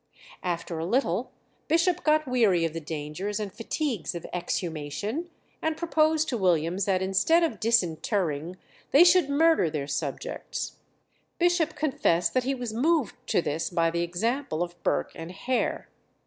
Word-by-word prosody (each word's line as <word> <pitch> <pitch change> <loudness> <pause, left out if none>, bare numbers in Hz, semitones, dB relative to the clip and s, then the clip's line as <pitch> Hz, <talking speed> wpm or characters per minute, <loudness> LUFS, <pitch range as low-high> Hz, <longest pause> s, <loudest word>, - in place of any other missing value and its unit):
After 170 -2 -3
a 165 - -2
little 230 -1 0 0.4
Bishop 335 +2 +2
got 310 -1 +3
weary 215 -9 +3
of 165 - -2
the 165 - -3
dangers 160 +7 -4
and 205 -3 -4
fatigues 230 - -3
of 170 - -6
exhumation, 180 - -3 0.3
and 315 0 -1
proposed 315 -2 +2
to 240 - -1
Williams 180 0 +1
that 190 -2 +1
instead 195 - +3
of 330 - -1
disinterring 180 -5 0 0.3
they 290 +5 +7
should 355 -4 +5
murder 320 - +4
their 150 -2 -3
subjects. 140 -1 -4 0.6
Bishop 350 -3 +2
confessed 175 - +1
that 255 -1 +1
he 270 +1 0
was 245 -3 -5
moved 290 +2 +1
to 175 - +2
this 155 +3 -2
by 165 -2 +1
the 170 0 -1
example 180 - -1
of 175 -1 -9
Burke - - 0
and 165 +1 -8
Hare. 255 +7 -1
200 Hz, 150 wpm, -27 LUFS, -, 0.6 s, they